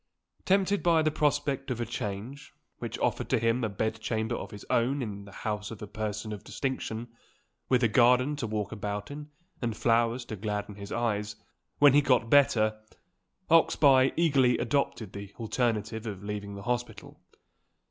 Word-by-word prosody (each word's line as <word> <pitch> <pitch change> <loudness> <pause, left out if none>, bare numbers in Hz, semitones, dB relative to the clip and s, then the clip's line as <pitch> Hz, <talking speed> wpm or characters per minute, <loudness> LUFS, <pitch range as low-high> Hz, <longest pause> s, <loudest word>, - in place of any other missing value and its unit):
Tempted 195 +1 +2
by 165 -2 +3
the 155 - +2
prospect 145 -2 0
of 125 -2 -2
a 120 - -1
change, 110 +10 -6 0.2
which - - -5
offered - - -1
to - - +3
him 115 +2 +1
a 110 - 0
bed 110 +3 -2
chamber 110 +1 -1
of - - -4
his 105 -2 -10
own 130 +5 +1
in 100 -3 -6
the 100 - -12
house 105 +1 -4
of 115 - -8
a 105 - -6
person 105 +1 -4
of 105 - -8
distinction 120 -4 -4 0.6
with 125 -1 +3
a - - +6
garden 125 +5 +4
to 120 - -3
walk 105 -1 -3
about 105 +1 -4
in, 150 +1 -8 0.3
and 115 -3 -2
flowers 115 +2 +2
to 110 - -6
gladden 105 0 -3
his 100 0 -9
eyes, 105 -3 -1 0.4
when 145 -2 +7
he 145 - +6
got 125 -5 +2
better 110 -6 +4 0.7
Oxbye 135 -5 +5
eagerly 140 -7 +4
adopted 120 -4 -1
the 100 0 -9
alternative 110 -1 -1
of 100 -2 -6
leaving 100 -1 -5
the 100 - -8
hospital. 120 -3 -4
115 Hz, 170 wpm, -29 LUFS, 105-130 Hz, 0.7 s, when